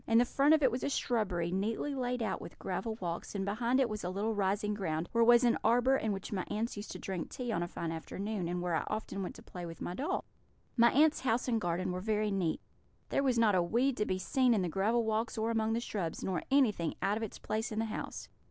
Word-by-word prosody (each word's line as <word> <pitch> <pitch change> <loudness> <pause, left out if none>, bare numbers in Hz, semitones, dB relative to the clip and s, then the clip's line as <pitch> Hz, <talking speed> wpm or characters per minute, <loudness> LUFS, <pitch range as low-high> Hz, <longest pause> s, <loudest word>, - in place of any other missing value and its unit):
In 225 - +4
the 240 - +6
front 280 +5 +4
of 305 - 0
it 260 - +5
was 245 - -3
a - - +1
shrubbery, 195 -11 0
neatly 220 +9 -1
laid 250 -2 -1
out - - -2
with - - -10
gravel 225 -2 -3
walks, 175 +2 -4
and 195 -1 -1
behind 235 +5 +1
it 265 - +4
was 215 -2 -5
a 180 - -2
little 205 +4 -1
rising 205 +1 0
ground, 165 -5 -2
where 230 0 +4
was 240 +1 +7
an 240 -1 +3
arbour, 245 +3 +4
in 220 -5 0
which 195 -1 -5
my 185 -2 -1
aunts 225 +3 -2
used 205 +1 -7
to - - -6
drink 185 -3 -4
tea 245 -2 -4
on 170 - 0
a 175 - -1
fine 170 -1 -4
afternoon, 190 +3 -4
and 175 +1 -2
where 175 -1 -1
I - - +1
often 215 -2 -3
went 185 - -4
to - - -12
play 180 - -8
with 165 -1 -7
my 175 - -4
doll. 275 - -2 0.5
My 235 -1 +6
aunts' 305 +3 +4
house 245 -1 0
and 230 -3 +1
garden 175 +2 -1
were 180 0 -3
very 215 0 0
neat; 185 -5 0 0.5
there - - +1
was 260 -3 +2
not 225 -3 +4
a 185 - +4
weed 240 +10 +1
to 210 - +1
be 185 - 0
seen 245 +6 +2
in 195 - +1
the 175 - -1
gravel 215 +7 +1
walks 220 +2 -1
or 220 +1 0
among 225 -1 +1
the 230 - +1
shrubs, 195 -8 -3
nor 185 -2 -1
anything 225 - +2
out 200 +1 +2
of 220 - -3
its 220 - -5
place 220 +2 -3
in 215 - -4
the 225 - +1
house. 220 - -5
215 Hz, 265 wpm, -32 LUFS, 185-235 Hz, 0.5 s, was